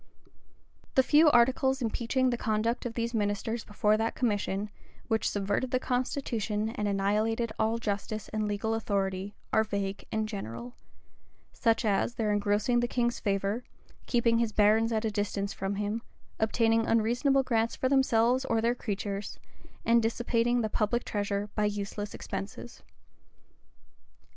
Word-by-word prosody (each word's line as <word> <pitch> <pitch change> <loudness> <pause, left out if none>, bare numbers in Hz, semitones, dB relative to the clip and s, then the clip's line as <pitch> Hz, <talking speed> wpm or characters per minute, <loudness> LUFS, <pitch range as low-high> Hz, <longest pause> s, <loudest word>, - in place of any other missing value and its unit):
The 265 - +6
few 300 +4 +6
articles 260 +1 +3
impeaching 250 +2 0
the - - +1
conduct 230 +1 -1
of 230 - -8
these 235 0 -2
ministers 215 +1 -1
before 210 0 +1
that 225 +1 -1
commission, 205 -3 -1 0.4
which 220 -1 +1
subverted 205 +5 -1
the 255 - +1
constitution, 235 -5 -1
and 210 -2 -2
annihilated 215 +3 0
all 225 +1 +2
justice 215 0 -3
and 215 -1 -1
legal 205 +2 -1
authority, 200 -2 -2 0.2
are 220 - +5
vague 200 -2 -3
and 220 0 0
general; 210 - -6 0.8
such 230 0 +1
as 210 +3 +1
their 215 -2 0
engrossing 205 +4 +2
the 240 - +1
king's 240 -1 0
favor, 200 +3 -1 0.4
keeping 230 -1 +2
his 230 -2 +1
barons 215 +2 +4
at 220 0 0
a 220 - 0
distance 205 0 -2
from 195 +1 -3
him, 210 +3 -2 0.4
obtaining 225 0 +2
unreasonable 245 +5 +2
grants 230 -2 0
for 260 - 0
themselves 255 -2 +3
or 225 - +1
their 230 +2 +2
creatures, 200 -3 -4 0.5
and 235 0 +5
dissipating 235 +1 +1
the 220 - 0
public 220 +3 0
treasure 205 0 -2
by 210 - +1
useless 205 0 -3
expenses. 195 +5 -7
220 Hz, 145 wpm, -29 LUFS, 205-235 Hz, 0.8 s, The